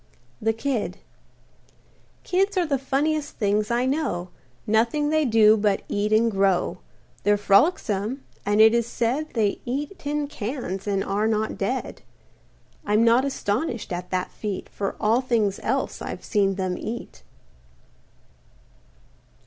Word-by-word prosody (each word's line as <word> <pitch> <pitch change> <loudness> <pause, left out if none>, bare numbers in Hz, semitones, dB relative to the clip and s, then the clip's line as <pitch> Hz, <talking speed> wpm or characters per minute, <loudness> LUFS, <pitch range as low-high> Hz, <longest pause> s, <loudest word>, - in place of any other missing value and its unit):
THE 225 - +2
KID 225 0 -2 1.3
Kids 390 +2 +1
are 360 - +3
the 280 -4 0
funniest 290 +3 -1
things 210 0 0
I 240 +1 +1
know; 260 - -1 0.4
Nothing 230 +8 +2
they 310 -1 +2
do 220 -3 +6
but 205 -2 +1
eat 205 +1 -1
and 225 +1 +4
grow. 195 -2 +1 0.4
They're 205 0 +3
frolicsome, 210 - +2 0.2
and 205 +1 +1
it 220 +1 +8
is 235 -1 +1
said 250 +7 -1
They 210 -3 +1
eat 290 +10 -4
tin 295 0 -2
cans 220 -7 -5
and 195 -1 0
are 205 +2 0
not 220 0 0
dead. - - -3 0.8
I'm 210 +2 +2
not 235 +3 +4
astonished 235 - -2
at 180 +1 -5
that 185 -1 -2
feat, 205 -3 -5
For 200 -1 -3
all 225 +4 +3
things 225 -6 0
else - - -2
I've - - -6
seen 195 -3 +1
them 185 -2 -2
eat. 230 - -6
220 Hz, 135 wpm, -24 LUFS, 205-270 Hz, 1.3 s, it